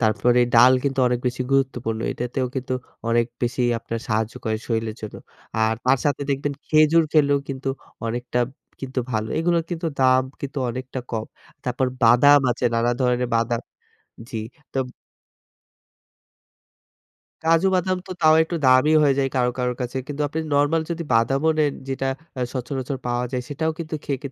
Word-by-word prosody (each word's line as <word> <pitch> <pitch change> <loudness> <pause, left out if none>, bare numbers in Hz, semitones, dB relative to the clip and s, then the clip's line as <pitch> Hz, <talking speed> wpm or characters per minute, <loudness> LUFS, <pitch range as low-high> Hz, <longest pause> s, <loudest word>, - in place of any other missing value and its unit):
তারপরে 110 +2 +3 0.2
ডাল 125 +1 +8
কিন্তু 135 -1 0
অনেক 125 0 0
বেশি 125 +1 -1
গুরুত্বপূর্ণ। 125 -5 0
এটাতেও 125 +2 -2
কিন্তু 130 -1 -2 0.3
অনেক 115 0 +3 0.2
বেশি 120 +1 0 0.2
আপনার 115 0 -5
সাহায্য 110 0 0
করে 110 -1 0
শরীরের 110 -2 -2
জন্য। 110 - -7 0.5
আর 110 - +1
তার 130 +1 +4
সাথে 145 -1 0
দেখবেন 140 +1 -1
খেজুর 155 +1 +5
খেলেও 145 -2 +4
কিন্তু 135 0 -4 0.4
অনেকটা 120 +1 -2 0.4
কিন্তু 130 -1 -3
ভালো। 110 -2 -1
এগুলোর 170 0 +1
কিন্তু 170 -1 -3
দাম 130 0 +5 0.2
কিন্তু 140 0 -4
অনেকটা 130 +2 -5
কম। 110 -1 -3 0.4
তারপর 125 +1 0 0.2
বাদাম 135 +5 +7
আছে, 125 +1 -2
নানা 115 +1 +2
ধরনের 125 -1 +1
বাদাম 115 0 +1 0.7
জি। 110 - -3 0.3
তোব 135 -1 -1 2.6
কাজু 165 +3 +4
বাদাম 185 0 +1
তো - - -11
তাও 155 -1 +6
একটু 165 +2 -3
দামি 130 +3 +5
হয়ে 140 -2 +4
যায় 135 -1 +2
কারো, 125 -1 +2
কারো, 125 0 0
কাছে। 125 +1 -3
কিন্তু 145 0 -3
আপনি 160 +3 -3
নরমাল 145 +3 +3
যদি 170 0 -2
বাদামও 135 +7 +3
নেন 150 -2 +3 0.2
যেটা 135 0 -2 0.3
আ - - -2
সচারাচর 130 +1 -3
পাওয়া 120 0 0
যায় 125 -1 -1
সেটাও 160 +2 -1
কিন্তু 160 -2 -5
খেয়ে 140 -2 -2
130 Hz, 160 wpm, -23 LUFS, 120-145 Hz, 2.6 s, ডাল